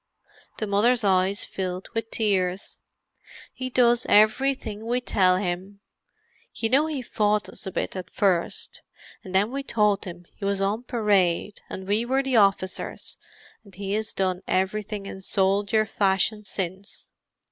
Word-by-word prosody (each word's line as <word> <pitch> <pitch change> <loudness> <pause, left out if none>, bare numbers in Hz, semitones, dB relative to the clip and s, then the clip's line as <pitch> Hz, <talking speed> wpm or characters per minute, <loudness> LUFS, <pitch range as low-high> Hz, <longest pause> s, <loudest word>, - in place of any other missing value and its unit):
The 215 - -2
mother's 220 +4 +3
eyes 190 0 +2
filled 185 -1 -4
with 225 0 -3
tears. 190 -3 -1 0.7
"He 255 0 -5
does 240 -1 +3
everything 220 0 +2
we 245 +1 +1
tell 185 -6 +3
him—you 200 - -6
know 280 +5 +3
he 290 -5 -3
fought 210 -2 0
us - - -9
a - - -3
bit - - -3
at 185 -1 -6
first, 185 -5 0 0.4
and 190 -3 -7
then 205 +4 +3
we 275 +1 -3
told 210 -6 +1
him 175 -1 -9
he - - -13
was 200 0 0
on 205 +5 -1
parade 205 -5 +1
and 190 0 -7
we 210 +3 +1
were 265 +3 +1
the 265 -2 -1
officers, 195 -2 0 0.4
and 200 -3 -17
he 195 +1 -4
has 220 +1 -1
done 185 -1 0
everything 200 +2 -1
in 190 -1 -8
soldier 200 +2 +1
fashion 205 +1 0
since. 190 0 -5
205 Hz, 145 wpm, -25 LUFS, 190-225 Hz, 0.7 s, mother's